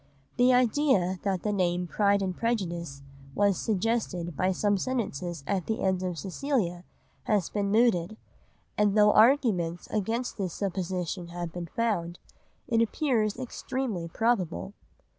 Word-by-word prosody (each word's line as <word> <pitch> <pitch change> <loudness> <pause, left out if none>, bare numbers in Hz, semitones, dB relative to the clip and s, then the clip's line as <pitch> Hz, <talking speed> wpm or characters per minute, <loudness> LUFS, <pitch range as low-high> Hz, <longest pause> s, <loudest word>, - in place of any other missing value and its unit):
The 250 +1 +5
idea 245 -7 +2
that 190 -3 -1
the 210 - 0
name 180 -2 +1
Pride 200 +2 +2
and 185 -1 -2
Prejudice 170 -11 -2 0.3
was 200 -1 +3
suggested 200 -5 -1
by 185 +5 +1
some 205 +2 +1
sentences 180 - -3
at 190 +2 -1
the 220 - -2
end 190 -1 +1
of 180 -2 -3
Cecilia 185 - -2 0.4
has 205 -5 +1
been 200 -1 -1
mooted, 215 -3 +2 0.6
and 210 0 +3
though 210 0 +6
arguments 215 -9 +3
against 225 +4 -2
this 185 -4 -2
supposition 180 -2 -3
have 170 -1 -6
been 175 -1 -5
found, 175 -6 -1 0.5
it 230 -3 +2
appears 230 -3 +1
extremely 255 -6 -3
probable. 200 -1 -1
200 Hz, 135 wpm, -28 LUFS, 175-225 Hz, 0.6 s, though